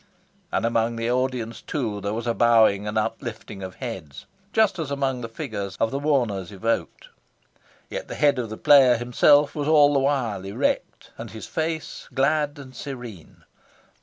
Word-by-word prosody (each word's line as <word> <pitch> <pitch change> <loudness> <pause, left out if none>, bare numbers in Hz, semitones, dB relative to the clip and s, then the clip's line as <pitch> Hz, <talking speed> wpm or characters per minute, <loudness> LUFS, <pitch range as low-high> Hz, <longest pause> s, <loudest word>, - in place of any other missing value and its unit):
And - - 0
among 115 0 +1
the 115 +1 -1
audience, 125 -2 -2
too, 110 -9 -3
there 100 +2 -2
was 115 +1 -4
a 120 - +1
bowing 110 -4 +4
and 105 +1 -2
uplifting 105 -1 -4
of 95 -1 -7
heads, 95 - -7 0.3
just 215 -5 +2
as 155 -4 -3
among 135 -3 -1
the 115 - -5
figures 105 -7 -5
of 115 - +1
the 135 - -2
mourners 120 -11 0
evoked. 115 +4 -3 0.8
Yet - - -6
the - - -6
head 145 -3 +3
of 115 -3 -3
the 110 - -6
player 130 -4 +6
himself 140 +5 +4
was 145 -1 -3
all 145 -2 +6
the 140 - +3
while 130 -8 0
erect, 95 +1 -2
and - - -6
his 110 - -8
face 160 0 -4
glad 145 +2 +1
and 130 -2 -11
serene. 120 - -9
120 Hz, 170 wpm, -24 LUFS, 110-140 Hz, 0.8 s, player